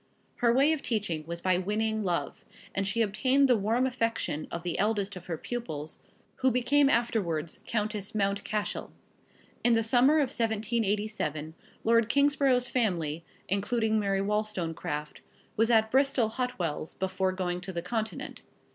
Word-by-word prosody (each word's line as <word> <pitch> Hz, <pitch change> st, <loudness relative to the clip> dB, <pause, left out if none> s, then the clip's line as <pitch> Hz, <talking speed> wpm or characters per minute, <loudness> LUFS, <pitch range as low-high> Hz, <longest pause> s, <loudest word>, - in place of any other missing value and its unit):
Her 235 Hz, -1 st, +3 dB
way 275 Hz, +6 st, +4 dB
of 310 Hz, -, -3 dB
teaching 195 Hz, -9 st, -2 dB
was 170 Hz, 0 st, -5 dB
by 185 Hz, -1 st, +2 dB
winning 215 Hz, +3 st, -1 dB
love, 175 Hz, -3 st, -2 dB, 0.3 s
and 195 Hz, 0 st, -1 dB
she 230 Hz, +3 st, +2 dB
obtained 260 Hz, +7 st, +3 dB
the 250 Hz, -, +5 dB
warm 225 Hz, +5 st, +1 dB
affection 230 Hz, -, -1 dB
of 170 Hz, -, -5 dB
the 175 Hz, -, -2 dB
eldest 205 Hz, -1 st, 0 dB
of 180 Hz, -1 st, -10 dB
her 165 Hz, -2 st, -3 dB
pupils, 155 Hz, -10 st, -5 dB, 0.4 s
who 260 Hz, -, +3 dB
became 275 Hz, +3 st, +3 dB
afterwards 190 Hz, -, 0 dB
Countess 210 Hz, -2 st, -2 dB
Mount 200 Hz, -1 st, 0 dB
Cashel. 210 Hz, -1 st, -3 dB, 0.7 s
In 240 Hz, -, +4 dB
the 225 Hz, 0 st, +3 dB
summer 250 Hz, +6 st, +4 dB
of 290 Hz, -5 st, +3 dB
1787, 215 Hz, -8 st, -1 dB, 0.3 s
Lord 230 Hz, 0 st, +3 dB
Kingsborough's 280 Hz, -3 st, +3 dB
family, 170 Hz, -, -1 dB, 0.2 s
including 220 Hz, +3 st, +1 dB
Mary 195 Hz, -1 st, +1 dB
Wollstonecraft, 180 Hz, -8 st, -2 dB, 0.3 s
was 225 Hz, +2 st, +2 dB
at 220 Hz, -2 st, +4 dB
Bristol 265 Hz, -4 st, +3 dB
Hot 250 Hz, +2 st, -3 dB
wells, 160 Hz, -3 st, -3 dB
before 190 Hz, 0 st, 0 dB
going 180 Hz, -1 st, -2 dB
to 190 Hz, +2 st, -6 dB
the 170 Hz, -2 st, -4 dB
Continent. 220 Hz, +2 st, -4 dB
215 Hz, 150 wpm, -29 LUFS, 185-235 Hz, 0.7 s, the